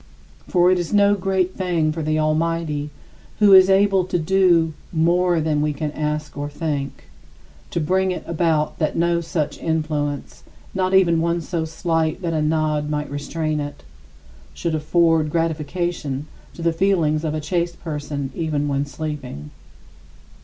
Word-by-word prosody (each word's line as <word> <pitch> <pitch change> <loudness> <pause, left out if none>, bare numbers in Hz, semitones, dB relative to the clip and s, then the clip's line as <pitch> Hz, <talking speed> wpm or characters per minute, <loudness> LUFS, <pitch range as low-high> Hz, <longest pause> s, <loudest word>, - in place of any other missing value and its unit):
For 180 0 +4
it 185 - +2
is 175 - -3
no 205 0 +5
great 190 -1 0
thing 170 -5 0
for 160 +1 -4
the 155 0 0
Almighty, 155 -1 0 0.5
who 205 -2 +6
is 190 0 +8
"able 195 -1 +4
to 180 -1 -1
do... 170 -2 +3 0.2
more 175 +1 +2
than 155 -1 0
we 150 0 0
can 150 +1 -3
ask 150 0 -3
or 145 0 -4
think," 145 - -4 0.7
to - - -2
bring 185 +4 +1
it 180 - -3
about 160 -2 0
that 155 - 0
no 170 0 +2
such 160 -2 -3
influence 150 -3 -2 0.3
not 185 0 +1
even 170 -4 +4
one 170 +1 +1
so 165 0 -3
slight 160 +1 -1
that 165 -1 -1
a 155 - 0
nod 150 -1 0
might 150 -1 -3
restrain 155 +2 -2
it 145 0 -6 0.7
should 165 - -2
afford 160 0 +2
gratification 160 -2 -2 0.3
to 170 - -7
the 165 -1 +2
feelings 165 -4 +1
of 155 -1 -1
a - - -1
chaste 170 +2 -2
person 145 -3 -4
even 150 -2 -1
when 140 0 -1
sleeping. 135 - -6
160 Hz, 155 wpm, -21 LUFS, 150-175 Hz, 0.7 s, is